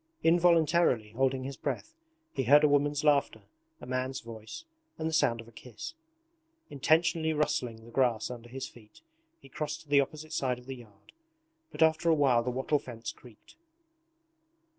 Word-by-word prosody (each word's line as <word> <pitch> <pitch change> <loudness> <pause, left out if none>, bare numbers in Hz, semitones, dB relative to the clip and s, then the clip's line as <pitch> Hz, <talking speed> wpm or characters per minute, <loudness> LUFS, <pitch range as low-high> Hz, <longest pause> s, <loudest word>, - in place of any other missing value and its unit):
Involuntarily 165 -8 +3
holding 130 +2 0
his 135 0 -6
breath, 320 - -4 0.4
he 135 - -1
heard 145 +5 +7
a - - +7
woman's 145 0 +2
laughter, 145 -2 +2 0.4
a - - -10
man's 130 +1 -2
voice, 115 - -9 0.3
and 160 - -2
the 160 - -3
sound 135 -7 +2
of 115 - -9
a - - -15
kiss. 125 - -9 0.8
Intentionally 160 +3 +2
rustling 130 -7 -1
the 120 - -13
grass 120 -3 +1
under 120 -1 -9
his 130 +1 -5
feet 110 -3 -18 0.4
he - - -16
crossed 150 +3 -4
to 155 - -21
the 140 -1 +6
opposite 155 +3 -6
side 130 -5 0
of 125 - -14
the 135 0 -7
yard, 110 -4 -17 0.6
but - - +2
after 160 +1 +3
a 165 - +5
while 135 -5 +4
the 120 - -2
wattle 130 +4 0
fence 120 -3 -7
creaked. 120 - -18
135 Hz, 170 wpm, -30 LUFS, 120-155 Hz, 0.8 s, heard